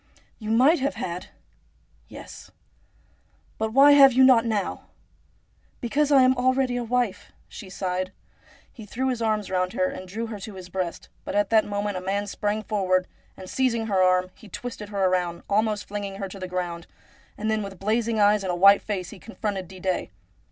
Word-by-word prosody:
' - - -38
You 215 -2 -6
might 260 +9 +4
have 275 +2 -1
had! 175 +1 -5 0.3
' - - -38
' - - -36
Yes.' - - -11 0.5
' - - -37
But 220 0 -1
why 275 +4 +7
have 275 -2 +8
you 260 +2 +5
not 245 -3 +6
now? 210 -3 -2 0.3
' - - -39
' - - -38
Because 290 +5 0
I 270 -2 +7
am 255 0 +4
already 255 0 +1
a 245 - -2
wife,' 230 -5 -2 0.2
she 200 - -10
sighed. 185 0 -3 0.6
He 220 -4 -11
threw 260 +5 -2
his 245 -2 -2
arms 215 -3 -1
round 185 0 0
her 275 +3 +1
and 185 -9 -8
drew 220 +5 -4
her 220 -2 -7
to 200 +1 -8
his 185 -1 -10
breast; 180 -2 -4
but - - -5
at 205 +1 +1
that 220 -1 +4
moment 205 -1 -3
a - - -4
man 200 +2 -2
sprang 210 +1 -2
forward, 185 -4 +1 0.3
and, 185 - -10
seizing 235 -1 0
her 195 -4 +1
arm, 185 0 +3
he 220 - -16
twisted 215 -1 -7
her 200 -2 +1
round, 180 -2 -1
almost 215 0 0
flinging 200 -1 -5
her 195 0 -5
to 195 - -10
the 185 - -5
ground, 175 -2 -4 0.5
and 215 +1 -1
then 220 0 0
with 195 -2 -7
blazing 220 +2 0
eyes 205 0 +4
and 180 -2 -2
white 200 +2 +7
face 190 -4 -4
he 210 - -11
confronted 205 -4 -5
Didet. 185 0 -3
205 Hz, 205 wpm, -25 LUFS, 185-230 Hz, 0.6 s, have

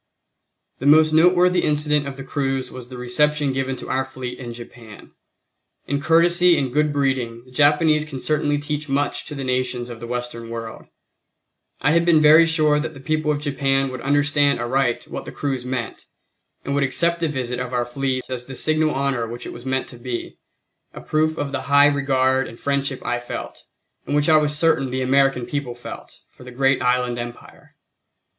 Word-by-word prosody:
The 135 - -2
most 155 +1 +6
noteworthy 180 +2 +4
incident 150 -1 +1
of 135 -1 -7
the 135 - -7
cruise 135 -1 -2
was 125 -1 -9
the 130 - -9
reception 145 +3 +1
given 135 0 -2
to - - -9
our 135 0 +1
fleet 130 -2 -7
in 120 -2 -7
Japan. 115 -2 -12 0.7
In 140 +1 -2
courtesy 170 +2 +4
and 130 -3 -2
good 150 +1 +2
breeding, 130 -5 -1
the 130 - -18
Japanese 150 +3 +3
can 150 -4 -7
certainly 145 +1 0
teach 150 0 -4
much 140 +1 -1
to 150 - -7
the 135 - -5
nations 125 -1 -2
of 115 - -9
the 120 - -7
Western 120 -1 -5
world. 115 -1 -7 1.0
I 145 - +4
had 170 +1 +3
been 170 -2 +4
very 155 +2 +7
sure 155 -2 +2
that 155 0 -4
the - - -10
people 155 +3 -1
of 150 -1 +1
Japan 135 -2 0
would 130 -1 -7
understand 145 0 +2
aright 120 +1 0
what - - -7
the - - -7
cruise 130 -3 -3
meant, 125 -3 -5 0.6
and 140 - -2
would 140 - +1
accept 170 +5 +1
the 165 - 0
visit 125 -4 -3
of 125 0 -4
our 125 -1 0
fleet 130 +1 -3
as 125 -1 -6
the 135 - -8
signal 155 +1 +1
honor 135 -4 -1
which 120 +2 -7
it - - -7
was 120 +2 -10
meant 130 0 -1
to 120 - -10
be, 120 -1 -6 0.6
a - - -7
proof 155 +1 0
of 145 -1 -3
the - - -3
high 140 +1 +5
regard 135 -2 +2
and 115 - -12
friendship 140 -1 -2
I 120 0 -1
felt, 120 - -8 0.4
and 145 - -1
which 145 +1 +2
I 155 - +7
was 150 -1 +1
certain 150 -4 +2
the 130 +1 -2
American 135 -1 +2
people 125 -1 -4
felt, 120 - -10
for - - -16
the 125 - -10
great 135 +1 +1
Island 125 -1 +1
Empire. 120 0 -10
135 Hz, 195 wpm, -21 LUFS, 125-150 Hz, 1.0 s, very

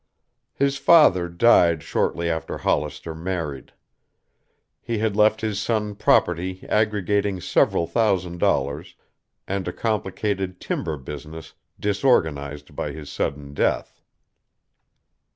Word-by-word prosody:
His 140 0 +1
father 95 - +5
died 85 -4 +4
shortly 85 0 -1
after 80 -1 -3
Hollister 75 +2 -2
married. 80 -4 -5 1.1
He 115 - -3
had 105 -1 0
left 110 +1 +3
his 110 -2 -2
son 110 -1 -1
property 90 -2 +1
aggregating 105 -2 +1
several 85 - +2
thousand 90 -5 0
dollars 70 +2 0 0.5
and 95 -1 -3
a - - -1
complicated 100 -3 -2
timber 75 - -3
business 75 +4 -9 0.3
disorganized 75 - 0
by 75 - -3
his 75 -1 -9
sudden 70 0 -3
death. - - -1
90 Hz, 105 wpm, -23 LUFS, 80-105 Hz, 1.1 s, father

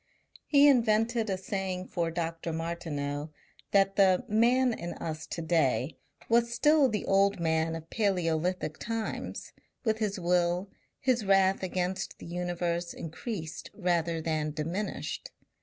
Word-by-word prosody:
He 285 -1 +6
invented 230 -3 +3
a 190 - 0
saying 190 -1 -3
for 170 -2 -1
Dr. 165 0 -3
Martineau 160 -3 -3 0.4
that 195 -1 +3
the 190 -2 +4
Man 240 +4 +3
in 175 -5 -5
us 160 -1 -5
to 165 - -4
day 160 -3 +1 0.3
was 235 0 +3
still 295 +2 +4
the 210 -3 -2
old 195 0 +3
man 160 -1 +1
of 165 0 -8
Palaeolithic 180 -5 0
times, 225 -1 -4 0.3
with 220 -2 +1
his 205 -3 -1
will, 175 +2 +1 0.3
his 250 -3 +1
wrath 195 -1 +4
against 185 0 -2
the - - -11
universe 175 0 -2
increased 165 0 -6
rather 170 -3 0
than 155 -1 -1
diminished. 165 +8 -3
180 Hz, 130 wpm, -29 LUFS, 165-215 Hz, 0.4 s, He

